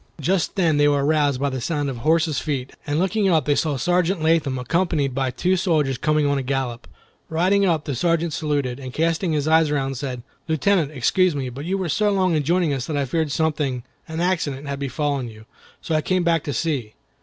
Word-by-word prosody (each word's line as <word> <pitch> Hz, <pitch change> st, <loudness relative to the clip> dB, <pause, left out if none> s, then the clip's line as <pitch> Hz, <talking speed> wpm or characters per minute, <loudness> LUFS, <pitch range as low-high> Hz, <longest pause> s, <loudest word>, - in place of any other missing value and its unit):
Just 175 Hz, +5 st, 0 dB
then 165 Hz, -6 st, +2 dB
they 145 Hz, 0 st, +4 dB
were 145 Hz, -1 st, +2 dB
aroused 145 Hz, -3 st, +2 dB
by 140 Hz, 0 st, 0 dB
the 130 Hz, -1 st, -4 dB
sound 145 Hz, +2 st, -1 dB
of 135 Hz, -3 st, -4 dB
horses' 155 Hz, +3 st, +1 dB
feet, 135 Hz, -4 st, -3 dB, 0.2 s
and 145 Hz, +1 st, 0 dB
looking 195 Hz, +3 st, +1 dB
up 160 Hz, -6 st, +2 dB
they 145 Hz, -, +3 dB
saw 145 Hz, -1 st, 0 dB
Sergeant 180 Hz, +2 st, +1 dB
Latham 160 Hz, -5 st, +2 dB
accompanied 145 Hz, +1 st, 0 dB
by 135 Hz, 0 st, 0 dB
two 180 Hz, +9 st, 0 dB
soldiers 155 Hz, -8 st, +1 dB
coming 155 Hz, 0 st, +2 dB
on 140 Hz, -1 st, +1 dB
a -, -, -1 dB
gallop. 130 Hz, -2 st, -3 dB, 0.4 s
Riding 190 Hz, +5 st, +2 dB
up, 160 Hz, -4 st, +1 dB
the 145 Hz, -, -2 dB
Sergeant 165 Hz, +4 st, 0 dB
saluted, 145 Hz, -5 st, -1 dB
and 130 Hz, -2 st, -8 dB
casting 165 Hz, +2 st, +1 dB
his 150 Hz, -2 st, 0 dB
sharp 155 Hz, +2 st, +1 dB
eyes 155 Hz, -, 0 dB
around, 135 Hz, -2 st, -1 dB
said, 125 Hz, -2 st, -5 dB, 0.2 s
"Lieutenant, 160 Hz, 0 st, +2 dB
excuse 155 Hz, +5 st, +2 dB
me, 135 Hz, -3 st, -3 dB
but 135 Hz, +5 st, -7 dB
you 190 Hz, +3 st, -1 dB
were 190 Hz, -2 st, -2 dB
so 210 Hz, +7 st, +1 dB
long 185 Hz, -3 st, +2 dB
in 155 Hz, -, +2 dB
joining 165 Hz, +1 st, +1 dB
us 130 Hz, -2 st, -3 dB
that 150 Hz, -, -2 dB
I 140 Hz, -, 0 dB
feared 155 Hz, +2 st, -1 dB
something—an 150 Hz, 0 st, -3 dB
accident—had 145 Hz, -6 st, -1 dB
befallen 140 Hz, -2 st, -2 dB
you, 110 Hz, 0 st, -14 dB, 0.4 s
so 165 Hz, -, -3 dB
I 155 Hz, -, +2 dB
came 185 Hz, +2 st, 0 dB
back 165 Hz, -2 st, +2 dB
to 145 Hz, -, -2 dB
see. 135 Hz, -11 st, -2 dB
150 Hz, 215 wpm, -22 LUFS, 135-165 Hz, 0.4 s, they